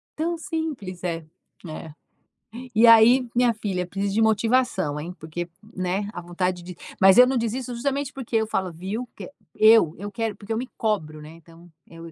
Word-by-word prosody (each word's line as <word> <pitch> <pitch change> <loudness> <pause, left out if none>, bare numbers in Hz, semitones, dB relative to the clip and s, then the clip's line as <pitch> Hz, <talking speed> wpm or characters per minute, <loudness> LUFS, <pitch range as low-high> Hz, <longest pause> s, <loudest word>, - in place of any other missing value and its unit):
Tão 335 +2 -2
simples 290 - -5
é, 165 -2 -3 0.4
é. 155 0 -8 0.8
E 230 +2 +6
aí, 235 +3 +7
minha 245 -1 +3
filha, 195 -5 -3
preciso 195 +1 -3
de 225 - +2
motivação, 220 - +1
hein. 170 +4 -6
Porque, 165 +2 -5 0.3
né, 185 +2 -2
a - - -6
vontade 175 +1 -3
de 180 0 -9 0.3
mas 190 +2 +7
eu 250 - +9
não 260 0 0
desisto 240 +2 -3
justamente 280 +2 -2
porque 250 -3 -6
eu 220 -1 0
falo: 190 -4 -2
"Viu" 200 +9 -5
que - - -9 0.2
eu 215 -7 +6
eu 205 0 -6
quero 225 -2 -3
porque 205 +2 -10
eu 220 - -1
me 250 - -3
cobro, 155 -9 -2
né. 150 - -11
Então 165 +1 -18 0.2
eu 165 0 -11
205 Hz, 185 wpm, -24 LUFS, 175-235 Hz, 0.8 s, eu